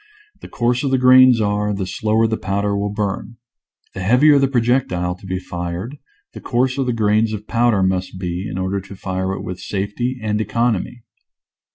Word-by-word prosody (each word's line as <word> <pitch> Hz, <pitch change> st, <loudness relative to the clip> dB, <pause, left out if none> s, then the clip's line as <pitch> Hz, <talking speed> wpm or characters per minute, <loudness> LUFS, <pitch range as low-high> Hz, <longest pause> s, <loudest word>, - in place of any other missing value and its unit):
The -, -, -10 dB
coarser 125 Hz, +3 st, 0 dB
the 135 Hz, 0 st, +2 dB
grains 130 Hz, -1 st, +6 dB
are, 105 Hz, -1 st, 0 dB
the 95 Hz, -1 st, -3 dB
slower 110 Hz, +4 st, +1 dB
the 110 Hz, 0 st, 0 dB
powder 100 Hz, 0 st, -1 dB
will 100 Hz, 0 st, -1 dB
burn. 105 Hz, +2 st, -4 dB, 0.6 s
The -, -, -7 dB
heavier 135 Hz, +9 st, +5 dB
the 135 Hz, -, +3 dB
pro 130 Hz, -2 st, +1 dB
jectile 90 Hz, -8 st, 0 dB
to 95 Hz, -, -12 dB
be 95 Hz, 0 st, -2 dB
fired 90 Hz, +7 st, -5 dB, 0.4 s
the -, -, -9 dB
coarser 130 Hz, +2 st, 0 dB
the 125 Hz, -, -1 dB
grains 110 Hz, -1 st, +1 dB
of 105 Hz, 0 st, -6 dB
powder 115 Hz, -4 st, +2 dB
must 95 Hz, 0 st, -1 dB
be 90 Hz, +2 st, -4 dB
in 90 Hz, -, -5 dB
order 95 Hz, +1 st, -2 dB
to 95 Hz, +1 st, -11 dB
fire 95 Hz, 0 st, -3 dB
it -, -, -6 dB
with 90 Hz, 0 st, -6 dB
safety 105 Hz, +7 st, -3 dB
and 110 Hz, -1 st, -1 dB
economy. 115 Hz, +1 st, -1 dB
105 Hz, 185 wpm, -19 LUFS, 95-120 Hz, 0.6 s, grains